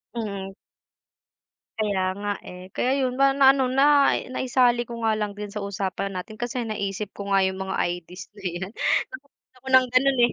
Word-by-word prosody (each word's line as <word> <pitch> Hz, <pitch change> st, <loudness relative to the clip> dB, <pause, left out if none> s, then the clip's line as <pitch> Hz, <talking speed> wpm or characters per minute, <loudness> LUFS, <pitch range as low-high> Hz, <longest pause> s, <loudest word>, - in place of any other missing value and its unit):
Mm. 200 Hz, -4 st, -4 dB, 1.3 s
Kaya 205 Hz, -3 st, 0 dB, 0.2 s
nga 205 Hz, 0 st, -2 dB, 0.2 s
eh, 180 Hz, 0 st, -9 dB
kaya 255 Hz, -, 0 dB
yun, 255 Hz, -2 st, 0 dB
ma 275 Hz, 0 st, +4 dB
na-ano 265 Hz, -1 st, +5 dB
na 280 Hz, +2 st, +5 dB, 0.2 s
naisali 245 Hz, -2 st, +2 dB
ko 235 Hz, 0 st, -6 dB
nga 220 Hz, -, +3 dB
lang 210 Hz, -1 st, -3 dB
din 210 Hz, -1 st, -6 dB
sa 210 Hz, -, -4 dB
usapan 195 Hz, 0 st, -3 dB
natin 185 Hz, +3 st, -6 dB
kasi 240 Hz, 0 st, -2 dB
naisip 205 Hz, -2 st, -4 dB
ko 200 Hz, 0 st, -7 dB
nga 195 Hz, -1 st, +4 dB
yung 190 Hz, 0 st, -2 dB
mga -, -, -1 dB
ID's 175 Hz, -1 st, -4 dB, 0.2 s
na 205 Hz, -, -14 dB
yan 175 Hz, +2 st, -5 dB
na 310 Hz, -, 0 dB, 0.4 s
ako 265 Hz, -, -16 dB
ng 260 Hz, -1 st, +6 dB
ganon 270 Hz, +1 st, +4 dB
eh. 240 Hz, -, -1 dB
215 Hz, 180 wpm, -24 LUFS, 195-255 Hz, 1.3 s, ng